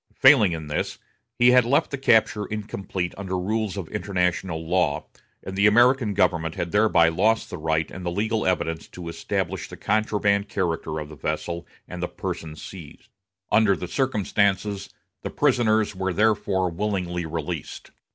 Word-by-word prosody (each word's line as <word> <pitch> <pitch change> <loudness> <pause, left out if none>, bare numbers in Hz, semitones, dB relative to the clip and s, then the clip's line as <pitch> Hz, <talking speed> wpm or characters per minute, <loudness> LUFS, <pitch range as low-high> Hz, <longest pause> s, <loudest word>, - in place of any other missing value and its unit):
Failing 100 -4 +6
in 80 -2 -4
this, 75 - -3 0.4
he 120 0 +6
had 125 0 +6
left 125 +5 +1
the 140 - -2
capture 110 -5 +3
incomplete 95 -4 -4
under 95 -2 -3
rules 105 +2 -2
of 95 -5 -4
international 90 -5 -1
law, 85 -4 +1 0.4
and 95 - -6
the 100 +2 +4
American 120 0 +4
government 85 -4 +1
had 85 -1 -3
thereby 105 -6 +4
lost 105 +7 +1
the - - -5
right 80 0 0
and 95 - -8
the 90 - -1
legal 110 +4 -1
evidence 80 -3 -1
to 85 -2 -8
establish 85 - -3
the - - -9
contraband 105 -1 +1
character 85 -4 -2
of 75 -1 -5
the 75 - -10
vessel 85 +3 -4 0.2
and 90 -1 -7
the 90 - -1
persons 80 -3 -6
seized. 85 -6 -11 0.4
Under 105 -3 +4
the 90 - -6
circumstances, 100 -4 0 0.3
the - - -4
prisoners 110 -7 +2
were 95 0 -2
therefore 100 -3 +1
willingly 90 -2 -2
released. 80 -1 -5
95 Hz, 160 wpm, -24 LUFS, 85-105 Hz, 0.4 s, Failing